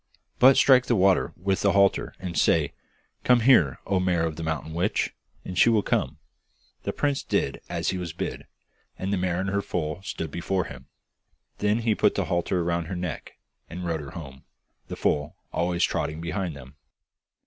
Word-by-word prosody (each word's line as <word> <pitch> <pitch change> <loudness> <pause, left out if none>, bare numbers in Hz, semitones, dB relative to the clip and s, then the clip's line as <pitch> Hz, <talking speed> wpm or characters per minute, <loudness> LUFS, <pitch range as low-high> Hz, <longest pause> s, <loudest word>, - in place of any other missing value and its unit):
But 130 +1 +7
strike 130 -2 +6
the 120 - +3
water 95 -1 +3
with 95 +2 -1
the 100 - +3
halter 100 -1 +2
and 90 -2 -5
say, 75 -1 +2 0.5
"Come 125 -1 +4
here, 100 - +5
O 95 -2 +1
mare 90 -2 +1
of 80 -1 -3
the 80 - -7
mountain 80 -1 -3
witch!" 90 +6 0 0.3
and 90 - -6
she 90 - +5
will 110 -3 +3
come.' - - -1 0.6
The - - -2
prince 145 -2 0
did 70 - -1
as - - -1
he 95 - -2
was 85 -2 -4
bid, - - -5 0.5
and 95 +2 -2
the - - +1
mare 90 -1 -1
and 95 +1 -1
her 100 0 +1
foal 80 -2 -3
stood 80 -5 -5
before 90 +3 -1
him. 65 -4 -11 0.7
Then 105 +3 +1
he 115 -1 +2
put - - +2
the - - 0
halter 85 +1 0
round 85 -1 -1
her 95 - -4
neck, 90 -3 -5 0.4
and 90 +1 -6
rode 80 -2 -1
her 70 - -8
home, 65 -5 -10 0.4
the - - -5
foal 75 0 -1 0.2
always 85 0 0
trotting 75 +1 -1
behind 85 0 -3
them. 70 +1 -13
90 Hz, 190 wpm, -26 LUFS, 80-100 Hz, 0.7 s, But